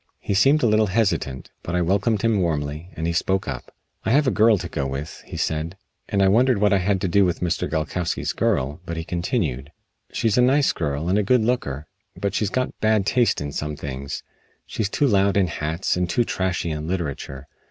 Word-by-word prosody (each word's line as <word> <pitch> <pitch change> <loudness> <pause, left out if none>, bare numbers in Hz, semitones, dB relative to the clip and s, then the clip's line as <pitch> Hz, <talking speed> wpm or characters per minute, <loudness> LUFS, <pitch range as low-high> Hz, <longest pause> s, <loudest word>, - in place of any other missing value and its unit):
He - - -2
seemed 135 +9 +4
a - - +5
little 110 -1 +3
hesitant, 95 - -1
but 85 - -4
I 90 - +2
welcomed 100 +4 +1
him 110 -4 +2
warmly, 75 0 -2
and 80 - -3
he 85 - 0
spoke 95 +2 0
up. 65 -3 -6 0.3
"I - - -1
have 145 +6 +4
a 130 - +3
girl 110 0 +5
to - - -5
go 70 -1 -2
with," 70 +4 -6
he - - -7
said, 80 +4 -2 0.3
and 100 -2 +2
I - - +5
wondered 120 +4 +4
what 105 0 +3
I 100 - +4
had 95 +1 +1
to - - 0
do 100 +3 +4
with 90 -2 0
Mr. 85 -3 -1
Gilkowsky's 80 +2 -2
girl, 70 +6 0
but 85 -1 -5
he 80 - -3
continued: 85 - -2 0.4
"She's 115 +1 +1
a - - +6
nice 135 +3 +4
girl 75 0 -2
and 95 +3 +2
a - - +3
good 115 +3 +3
looker, 75 - -1 0.3
but 100 -2 -1
she's 105 -1 0
got 130 +3 -1
bad 110 -2 +2
taste 120 -3 +2
in 75 0 -4
some 75 +1 -3
things. 70 -1 -6 0.4
She's 105 -3 -2
too 145 - +1
loud 100 -5 +3
in 100 - +4
hats, 80 +1 -2
and 90 -1 -1
too 120 +8 +2
trashy 95 -6 -1
in 75 0 -4
literature. 70 -6 -4
95 Hz, 215 wpm, -23 LUFS, 75-105 Hz, 0.4 s, a